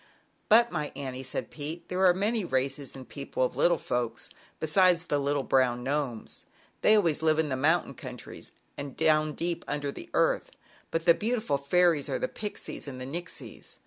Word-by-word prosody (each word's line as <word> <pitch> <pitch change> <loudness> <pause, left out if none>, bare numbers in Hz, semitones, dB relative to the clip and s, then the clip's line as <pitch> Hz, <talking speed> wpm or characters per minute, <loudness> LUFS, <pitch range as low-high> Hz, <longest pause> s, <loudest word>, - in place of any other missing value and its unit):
"But, 235 +2 +6
my 150 -4 -2
Annie," 130 -2 -5
said 130 0 -4
Pete, 155 +3 -6
"there 185 +1 -1
are 180 - +6
many 210 +3 0
races 135 -2 -1
and 130 -1 -10
people 140 -2 -3
of 125 - -1
little 170 +5 +3
folks 120 -2 -3 0.3
besides 175 +2 +4
the 145 -4 0
little 140 0 0
brown 125 -2 +2
Gnomes. 135 -4 -3 0.4
They 215 - +6
always 170 -8 +2
live 155 -1 +3
in 160 -2 +1
mountain 160 +4 +2
countries - - -9 0.3
and 140 -2 -6
down 155 -1 +3
deep 170 +1 -2
under 145 -1 -2
the - - -10
earth, - - +2 0.4
but 165 0 -2
the 170 - +8
beautiful 215 - -1
fairies 160 0 +3
are 135 - 0
the - - -1
Pixies 210 -7 -6
and 130 -2 -6
the 130 - -5
Nixies. 170 +6 -7
150 Hz, 175 wpm, -28 LUFS, 135-175 Hz, 0.4 s, the